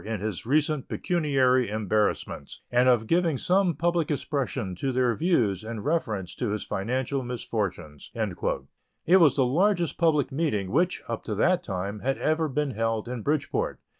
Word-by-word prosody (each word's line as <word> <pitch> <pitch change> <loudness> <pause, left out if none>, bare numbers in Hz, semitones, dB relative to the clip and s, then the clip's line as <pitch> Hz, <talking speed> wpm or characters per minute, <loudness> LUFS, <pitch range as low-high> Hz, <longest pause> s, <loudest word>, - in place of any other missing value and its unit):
in 110 -1 -3
his 105 0 -4
recent 150 0 +1
pecuniary 135 - +1
embarrassments, 105 0 -1
and 125 +1 +4
of 120 -3 +3
giving 165 +1 +2
some 180 +2 +2
public 170 +1 0
expression 135 - -2
to 130 +10 -2
their 125 -1 +2
views 115 - +1
in 110 0 -5
reference 110 - -2
to 120 - -3
his 105 0 -2
financial 130 +6 -2
misfortunes." 100 - -4 0.9
It 180 +3 +6
was 155 -7 +5
the 135 - +3
largest 175 +5 +1
public 150 -5 +2
meeting 135 - -1
which, 175 +6 +1
up 115 -1 -4
to 105 - -3
that 180 - +2
time, 100 - -4
had 135 +4 -1
ever 155 0 0
been 145 +1 -1
held 115 -1 -1
in 125 -1 -4
Bridgeport. 145 +3 -1
130 Hz, 160 wpm, -26 LUFS, 110-155 Hz, 0.9 s, It